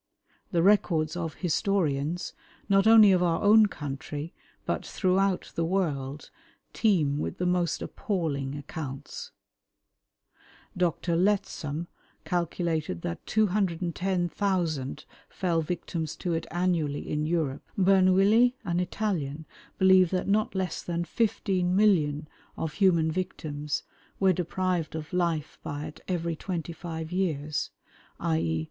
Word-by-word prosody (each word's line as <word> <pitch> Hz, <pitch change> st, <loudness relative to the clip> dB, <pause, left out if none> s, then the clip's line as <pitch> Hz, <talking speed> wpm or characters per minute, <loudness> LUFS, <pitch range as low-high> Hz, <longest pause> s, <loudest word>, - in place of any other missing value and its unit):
The 170 Hz, -2 st, +2 dB
records 175 Hz, -6 st, +3 dB
of 165 Hz, -3 st, -3 dB
historians, 170 Hz, -3 st, 0 dB, 0.3 s
not 195 Hz, +1 st, +4 dB
only 220 Hz, -3 st, +8 dB
of 185 Hz, -1 st, +3 dB
our 170 Hz, 0 st, +1 dB
own 215 Hz, +1 st, +7 dB
country, 145 Hz, -1 st, -6 dB, 0.3 s
but -, -, -1 dB
throughout 190 Hz, 0 st, 0 dB
the 165 Hz, -, -1 dB
world, 150 Hz, -6 st, -2 dB, 0.4 s
teem 155 Hz, -10 st, +2 dB
with -, -, -3 dB
the 180 Hz, -, -1 dB
most 180 Hz, -2 st, +1 dB
appalling 145 Hz, -9 st, -2 dB
accounts. 145 Hz, -1 st, -7 dB, 1.5 s
Dr. 170 Hz, -1 st, 0 dB
Lettsom 180 Hz, -5 st, 0 dB, 0.4 s
calculated 165 Hz, -, -1 dB
that 85 Hz, -, -4 dB
210,000 180 Hz, -5 st, 0 dB, 0.2 s
fell 170 Hz, -4 st, 0 dB
victims 160 Hz, -1 st, -3 dB
to 175 Hz, -3 st, -2 dB
it 165 Hz, 0 st, -2 dB
annually 170 Hz, -4 st, 0 dB
in 150 Hz, 0 st, -1 dB
Europe. 155 Hz, -5 st, -1 dB
Bernouilli, 195 Hz, +5 st, +5 dB
an 175 Hz, -1 st, 0 dB
Italian, 170 Hz, -6 st, -2 dB, 0.3 s
believed 190 Hz, -1 st, +6 dB
that 185 Hz, -, 0 dB
not 210 Hz, +1 st, +1 dB
less 185 Hz, -3 st, -2 dB
than 170 Hz, 0 st, -2 dB
15,000,000 180 Hz, -6 st, +2 dB, 0.3 s
of 160 Hz, -2 st, -3 dB
human 170 Hz, -5 st, +3 dB
victims 155 Hz, -5 st, -3 dB, 0.4 s
were 190 Hz, -1 st, +4 dB
deprived 180 Hz, -1 st, -1 dB
of 160 Hz, +2 st, -6 dB
life 170 Hz, -4 st, -1 dB
by 145 Hz, 0 st, -5 dB
it 155 Hz, +1 st, -10 dB
every 170 Hz, -2 st, -1 dB
twenty 170 Hz, -1 st, -4 dB
five 160 Hz, -1 st, -6 dB
years, 155 Hz, -5 st, -1 dB, 0.5 s
_i. 80 Hz, 0 st, 0 dB
170 Hz, 115 wpm, -28 LUFS, 155-190 Hz, 1.5 s, only